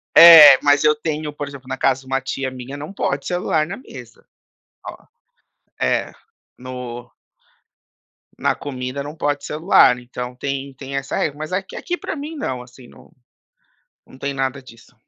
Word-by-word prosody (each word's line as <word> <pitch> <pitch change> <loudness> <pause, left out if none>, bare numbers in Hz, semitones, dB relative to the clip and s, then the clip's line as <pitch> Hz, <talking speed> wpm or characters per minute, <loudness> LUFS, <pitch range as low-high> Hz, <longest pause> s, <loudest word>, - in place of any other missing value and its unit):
É, 155 -5 +11
mas 145 0 +4
eu 150 0 +4
tenho, 150 0 -4
por 145 -1 -6
exemplo, 140 -2 -11
na 130 - -4
casa 135 0 +1
de 130 - -19
uma 135 0 -1
tia 135 0 -4
minha 130 +2 -8
não 150 +7 -8
pode 140 -6 -2
celular 175 -3 0
na 195 - -6
mesa. 125 - -13 0.6
Oh. - - -9 0.8
É, 65 - 0 0.5
no 125 -1 -8 1.3
na - - 0
comida 130 -1 -6
não 145 +2 -8
pode 145 -2 -2
celular 150 -5 +4
então, 125 0 -7
tem 135 +1 -5
tem, 135 +1 -8
essa 135 0 -3
regra. 145 -2 -2
Mas 155 +3 -6
aqui 190 +1 -4
aqui 355 0 -4
pra - - -6
mim 305 +2 -7
não, 130 - -4
assim, 125 0 -15
não - - -19 1.0
não 130 - -17
tem 140 0 -4
nada 135 0 -2
disso. 115 -1 -17
140 Hz, 165 wpm, -20 LUFS, 130-150 Hz, 1.3 s, É